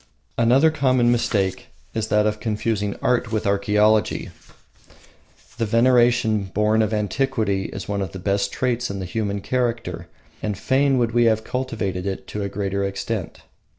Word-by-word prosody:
Another 130 +7 +4
common 130 -5 +2
mistake 100 -5 0 0.3
is 110 -1 -2
that 105 0 +2
of 105 0 0
confusing 105 -2 -1
art 125 -2 +1
with 110 -2 -1
archaeology. 105 +2 +2 1.3
The 115 - 0
veneration 120 -2 +3
born 105 +3 +1
of 110 -1 0
antiquity 105 -2 0
is 100 - -6
one 100 -1 -2
of 95 -3 -3
the 95 - -7
best 100 +1 0
traits 125 -1 -1
in 100 - -4
the 95 - -4
human 100 +1 -2
character, 115 -8 -2 0.3
and 105 -3 -2
fain 135 +4 +2
would 120 -2 +1
we 120 0 +3
have 110 -1 +4
it - - -22
cultivated 100 -7 -3
to 105 - -4
a 100 - -2
greater 100 0 -2
extent. 100 -1 -4
110 Hz, 155 wpm, -22 LUFS, 100-120 Hz, 1.3 s, Another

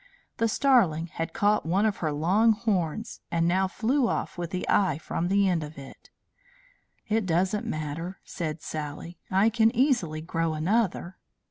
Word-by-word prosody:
The 230 - +2
starling 220 - +3
had 165 - -3
caught 205 +1 +2
one 185 +6 +1
of 215 -2 0
her 155 -3 -1
long 190 +10 +3
horns, 210 -1 -2
and 170 0 +1
now 190 +2 +2
flew 240 +7 +1
off - - -2
with 175 -2 -4
the 185 +1 -4
eye 190 -8 +2
from 165 +2 -3
the 200 +1 +3
end 175 -3 +1
of 150 0 -9
it. 135 -1 -12 1.0
"It 215 -2 0
doesn't 185 +5 0
matter," 155 +4 -4
said 155 -2 -5
Sally. 155 +3 -6
"I 195 +4 +4
can 225 0 +3
easily 230 - +1
grow 165 -1 -1
another." 185 +1 -1
180 Hz, 160 wpm, -27 LUFS, 160-215 Hz, 1.0 s, I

